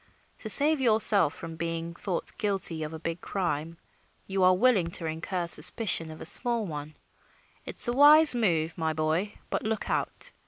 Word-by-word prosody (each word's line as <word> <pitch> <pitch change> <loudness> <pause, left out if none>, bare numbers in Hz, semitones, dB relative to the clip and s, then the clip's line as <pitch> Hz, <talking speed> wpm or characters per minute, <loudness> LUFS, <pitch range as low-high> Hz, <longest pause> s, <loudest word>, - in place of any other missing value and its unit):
To 220 - -3
save 290 +5 +4
yourself 215 - +3
from 165 -1 -10
being 165 0 -6
thought 180 0 -4
guilty 195 -6 0
of 155 0 -6
a 160 - -8
big 165 +1 -7
crime 165 -3 -5 0.5
you 195 0 -4
are 185 0 +3
willing 210 -7 +1
to 165 - -8
incur 170 +3 -5
suspicion 170 -1 +2
of 155 - -12
a - - -8
small 235 -3 0
one. 150 -3 -9 0.7
It's - - +7
a 240 - -1
wise 295 +3 +6
move, 170 -9 -2
my 160 -1 -2
boy, 160 +6 -3 0.2
but - - -2
look 220 0 -5
out! - - -4
180 Hz, 170 wpm, -26 LUFS, 160-220 Hz, 0.7 s, It's